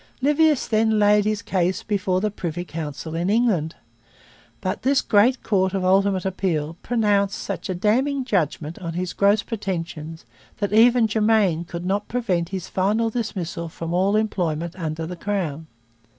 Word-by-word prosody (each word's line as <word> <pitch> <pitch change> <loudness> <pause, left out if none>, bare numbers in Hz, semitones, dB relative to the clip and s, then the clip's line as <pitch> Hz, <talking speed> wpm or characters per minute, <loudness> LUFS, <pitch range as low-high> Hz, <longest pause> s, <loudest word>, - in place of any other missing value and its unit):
Livius 295 +1 +3
then 220 0 +2
laid 210 0 +4
his 215 -1 -1
case 185 +3 0
before 190 -3 0
the 215 0 0
Privy 175 -2 -4
Council 160 -1 -6
in 170 +3 -1
England. 205 -8 +1 0.8
But 185 -1 -3
this 270 +1 +3
great 230 +5 +3
court 190 -2 +1
of 190 -1 -1
ultimate 195 0 +2
appeal 170 -5 -1
pronounced 205 -4 +1
such - - -5
a 185 - -1
damning 260 +8 +1
judgment 165 - -1
on 170 -3 -5
his 180 +1 -3
gross 200 +2 +3
pretensions 165 -6 -5 0.3
that 205 0 -2
even 235 +2 +6
Germain 210 -6 +2
could 170 0 -6
not 200 +2 -1
prevent 190 -9 -1
his 190 -2 -5
final 215 +4 0
dismissal 185 -8 -4
from 165 +1 -5
all 190 +3 +2
employment 170 -6 -1
under 160 -2 -4
the 180 +2 -6
Crown. 170 -5 -3
195 Hz, 155 wpm, -23 LUFS, 170-215 Hz, 0.8 s, even